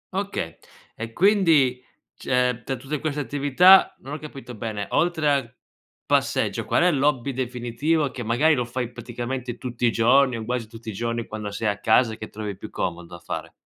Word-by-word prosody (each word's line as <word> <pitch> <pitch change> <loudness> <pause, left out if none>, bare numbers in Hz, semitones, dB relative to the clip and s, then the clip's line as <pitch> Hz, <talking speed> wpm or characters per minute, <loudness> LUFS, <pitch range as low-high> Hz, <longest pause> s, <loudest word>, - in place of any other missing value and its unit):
Okay. 195 - -3 0.4
E 115 0 -6
quindi 160 - +3 0.3
cioè 125 -2 0
tra 135 - -3
tutte 135 +4 -4
queste 150 -2 -2
attività, 145 +7 +5
non 140 +2 -8
ho 155 - -4
capito 135 -5 -9
bene 105 -2 -4
oltre 160 -3 +1
al 130 -4 -1 0.5
passeggio, - - +1
qual - - +2
è 180 - +5
l'hobby 140 -2 +1
definitivo 130 +4 -1
che 125 - -7
magari 120 +8 +3
lo 125 -3 +1
fai 125 0 -4
praticamente 120 +1 -5
tutti 120 -1 -2
i - - +3
giorni 125 +2 +4
o 110 - -5
quasi 120 -2 -2
tutti 115 0 -10
i 110 - -5
giorni, 115 +2 -2
quando 105 -1 -6
sei 105 +2 -3
a 100 - -3
casa 110 0 +3
che 110 - -8
trovi 105 -2 -5
più 105 +2 -9
comodo 85 -1 -4
da - - -11
fare? - - -6
125 Hz, 185 wpm, -24 LUFS, 115-145 Hz, 0.5 s, attività